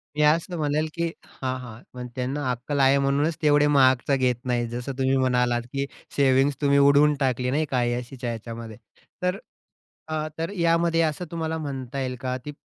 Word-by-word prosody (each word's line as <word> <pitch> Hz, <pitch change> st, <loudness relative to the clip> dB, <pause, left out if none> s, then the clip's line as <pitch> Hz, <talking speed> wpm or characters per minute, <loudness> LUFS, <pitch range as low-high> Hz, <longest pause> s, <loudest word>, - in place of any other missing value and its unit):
मी 150 Hz, -, 0 dB
असं 165 Hz, +3 st, +2 dB
म्हणेल 155 Hz, +1 st, 0 dB
की 170 Hz, 0 st, -1 dB, 0.3 s
हां, 130 Hz, -1 st, -1 dB
हां, 120 Hz, -2 st, -10 dB
पण 125 Hz, 0 st, -6 dB
त्यांना 130 Hz, +2 st, -2 dB
अक्कल 135 Hz, +4 st, -3 dB
आहे 135 Hz, +1 st, +5 dB
म्हणूनच 140 Hz, +4 st, +1 dB
तेवढे 150 Hz, -1 st, +4 dB
महागचे 135 Hz, -1 st, +4 dB
घेत 125 Hz, -2 st, +2 dB
नाही. 120 Hz, -1 st, 0 dB
जसं 120 Hz, +3 st, -5 dB
तुम्ही 135 Hz, 0 st, +2 dB
म्हणालात 125 Hz, -2 st, +2 dB
की 140 Hz, 0 st, -1 dB, 0.3 s
सेव्हिंग्ज 135 Hz, 0 st, +3 dB
तुम्ही 140 Hz, -1 st, +3 dB
उडवून 140 Hz, +1 st, +5 dB
टाकली, 125 Hz, -2 st, 0 dB
नाही 155 Hz, +2 st, +1 dB
का -, -, -22 dB
काही 120 Hz, -2 st, +1 dB
अय्याशीच्या 120 Hz, 0 st, -4 dB
याच्यामध्ये. 115 Hz, -1 st, -7 dB, 0.4 s
तर 180 Hz, +2 st, 0 dB, 0.7 s
अ, 155 Hz, 0 st, -1 dB
तर 165 Hz, +2 st, -2 dB
यामध्ये 165 Hz, 0 st, +2 dB
असं 155 Hz, +3 st, -1 dB
तुम्हाला 160 Hz, -1 st, -2 dB
म्हणता 135 Hz, -3 st, -5 dB
येईल 130 Hz, -1 st, -2 dB
का? 130 Hz, -1 st, -2 dB
ती 150 Hz, -, -4 dB
135 Hz, 180 wpm, -25 LUFS, 125-150 Hz, 0.7 s, आहे